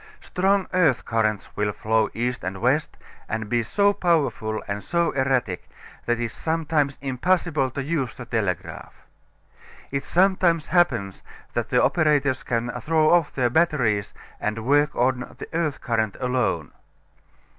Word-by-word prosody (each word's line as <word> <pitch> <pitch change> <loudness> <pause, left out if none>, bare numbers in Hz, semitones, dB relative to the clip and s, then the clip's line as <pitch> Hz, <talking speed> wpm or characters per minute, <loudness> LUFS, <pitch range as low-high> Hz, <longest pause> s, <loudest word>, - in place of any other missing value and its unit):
Strong 195 +1 +1
earth 170 -9 +3
currents 110 -3 -1
will 105 0 0
flow 110 +1 +1
east 125 +2 -2
and 95 +1 -4
west, 135 +6 0 0.3
and 110 -1 -3
be 120 +1 +2
so 200 - +2
powerful 150 - 0
and 100 0 -4
so 170 -1 +1
erratic 130 -8 -1 0.4
that 120 0 +1
it - - -1
is 115 - -6
sometimes 155 -3 0
impossible 145 +1 0
to 135 +2 -4
use 140 -5 -2
the 120 - -8
telegraph. 100 -7 -3 1.0
It 140 0 -2
sometimes 180 -3 +2
happens 120 - +1 0.3
that - - -2
the - - +3
operators 145 -5 +2
can 120 0 -2
throw 155 +3 +3
off 170 -3 +3
their 125 -3 +1
batteries 120 -11 +1 0.3
and 110 +1 -3
work 145 +2 +3
on 125 +1 0
the - - -7
earth 160 -3 -1
current 110 -4 -1
alone. 125 - -1
130 Hz, 145 wpm, -24 LUFS, 110-160 Hz, 1.0 s, earth